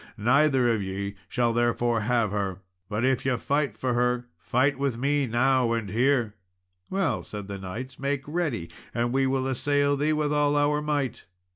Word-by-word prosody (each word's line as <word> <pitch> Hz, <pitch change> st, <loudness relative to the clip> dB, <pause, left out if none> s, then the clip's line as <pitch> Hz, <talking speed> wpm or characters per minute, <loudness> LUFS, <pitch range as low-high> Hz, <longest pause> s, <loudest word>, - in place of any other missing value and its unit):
Neither 130 Hz, +3 st, +3 dB
of 110 Hz, -, -1 dB
ye 100 Hz, +1 st, -4 dB, 0.2 s
shall 120 Hz, -2 st, +1 dB
therefore 120 Hz, 0 st, +1 dB
have 115 Hz, -1 st, +1 dB
her; 100 Hz, -3 st, -2 dB, 0.3 s
but 110 Hz, +3 st, 0 dB
if 130 Hz, -1 st, +1 dB
ye 130 Hz, -, +1 dB
will -, -, 0 dB
fight 145 Hz, +2 st, 0 dB
for 130 Hz, -1 st, -1 dB
her, 125 Hz, 0 st, +1 dB
fight 130 Hz, +8 st, +1 dB
with 140 Hz, -4 st, 0 dB
me 140 Hz, +2 st, +1 dB
now 125 Hz, 0 st, +2 dB
and 110 Hz, -5 st, -2 dB
here." 120 Hz, -1 st, +2 dB, 0.6 s
"Well," 190 Hz, 0 st, 0 dB
said 105 Hz, -2 st, -7 dB
the 100 Hz, -1 st, -6 dB
knights, 115 Hz, +8 st, -7 dB
"make 140 Hz, 0 st, -1 dB
ready, 145 Hz, -, -2 dB, 0.2 s
and 120 Hz, +1 st, 0 dB
we 135 Hz, 0 st, +2 dB
will 130 Hz, 0 st, 0 dB
assail 145 Hz, +2 st, +1 dB
thee 150 Hz, +2 st, +1 dB
with 150 Hz, -1 st, 0 dB
all 145 Hz, 0 st, +2 dB
our 145 Hz, +1 st, +2 dB
might." 145 Hz, -4 st, -2 dB
125 Hz, 180 wpm, -26 LUFS, 115-145 Hz, 0.6 s, Neither